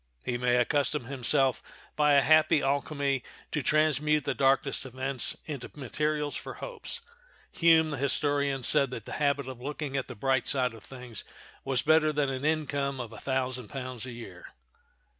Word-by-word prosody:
He 125 - -1
may 120 0 +1
accustom 140 +2 +1
himself, 130 0 +1 0.3
by 150 -1 +4
a 140 - +5
happy 155 0 +4
alchemy, 140 -1 0 0.3
to 150 - -1
transmute 150 0 +2
the 140 - -1
darkest 135 +1 +2
events 130 0 -2
into 145 -5 -6
materials 150 +2 -2
for - - -6
hopes. 475 -1 -6 0.5
Hume, 160 -2 +4
the 145 - -3
historian, 140 0 0
said 135 +2 +4
that 115 -4 -7
the - - -9
habit 140 -2 +1
of 130 -2 -8
looking 145 0 -4
at 135 - -1
the - - -8
bright 130 +2 0
side 125 -3 +1
of 115 - -13
things 125 -3 -9 0.4
was 135 -2 0
better 155 0 +4
than 145 -2 0
an 130 0 -4
income 145 -3 -1
of 115 -2 -6
a 110 - -9
thousand 130 -3 -2
pounds 130 -1 -5
a - - -6
year. 115 -7 -10
135 Hz, 170 wpm, -29 LUFS, 130-150 Hz, 0.5 s, a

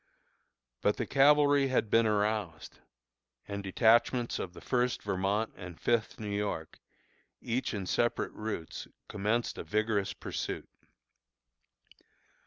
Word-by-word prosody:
But - - +2
the - - -1
cavalry 145 0 +5
had 125 -5 0
been 115 0 +5
aroused, 105 -5 -1 0.7
and 100 0 -4
detachments 115 +4 +3
of 90 - -5
the - - -11
First 125 -1 0
Vermont 100 +2 0
and 90 -3 -9
Fifth 115 -2 0
New 105 -2 -3
York, 100 -6 -3 0.6
each 125 +2 -2
in 100 -2 -3
separate 120 +5 0
routes, 105 -7 -5 0.2
commenced 105 +4 -1
a - - -4
vigorous 105 -2 0
pursuit. - - -5
110 Hz, 115 wpm, -31 LUFS, 100-120 Hz, 0.7 s, cavalry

